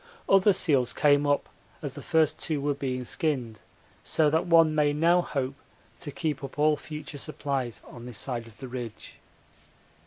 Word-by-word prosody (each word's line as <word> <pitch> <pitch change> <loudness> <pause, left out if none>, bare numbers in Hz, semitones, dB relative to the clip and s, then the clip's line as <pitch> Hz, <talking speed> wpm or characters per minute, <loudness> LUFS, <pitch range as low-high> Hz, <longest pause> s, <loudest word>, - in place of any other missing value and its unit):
Other 195 +1 +6
seals 140 -9 +2
came 145 -1 +3
up 145 0 +1 0.4
as - - -3
the - - -8
first 160 -2 +2
two 155 -3 -2
were 145 +1 0
being 130 -2 -3
skinned, 125 -6 -1 0.4
so 155 -2 +2
that 160 +3 +1
one 165 -2 +6
may 150 -1 +2
now 170 +4 +4
hope 135 -5 -2 0.5
to 155 - -5
keep 150 -1 -3
up 135 - -7
all 150 +1 +4
future 150 -1 -8
supplies 135 -5 -3
on 120 0 -10
this 125 - -4
side 120 -3 -3
of 110 - -16
the 130 - -8
ridge. 120 -3 -7
145 Hz, 175 wpm, -27 LUFS, 130-155 Hz, 0.5 s, Other